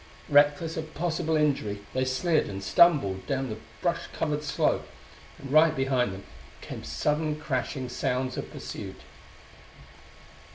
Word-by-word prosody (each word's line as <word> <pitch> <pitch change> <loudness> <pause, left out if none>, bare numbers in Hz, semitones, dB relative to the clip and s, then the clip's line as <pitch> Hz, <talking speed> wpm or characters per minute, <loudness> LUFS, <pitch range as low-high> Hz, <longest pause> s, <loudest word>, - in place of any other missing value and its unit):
Reckless 145 +3 +4
of 160 0 -6
possible 160 -1 0
injury, 110 -9 0
they 130 0 +1
slid 150 +5 +1
and 100 -1 -6
stumbled 100 - +4
down 135 -2 -1
the 110 0 -5 0.2
brush 175 -1 0
covered 150 -1 -2
slope 145 - 0 0.5
and 135 -1 -9
right 155 +1 +6
behind 130 -4 +1
them 95 +1 -8 0.4
came - - -8
sudden 150 0 -1
crashing 130 -2 -2
sounds 125 +1 -1
of - - -5
pursuit. - - -7
145 Hz, 130 wpm, -28 LUFS, 125-155 Hz, 0.5 s, right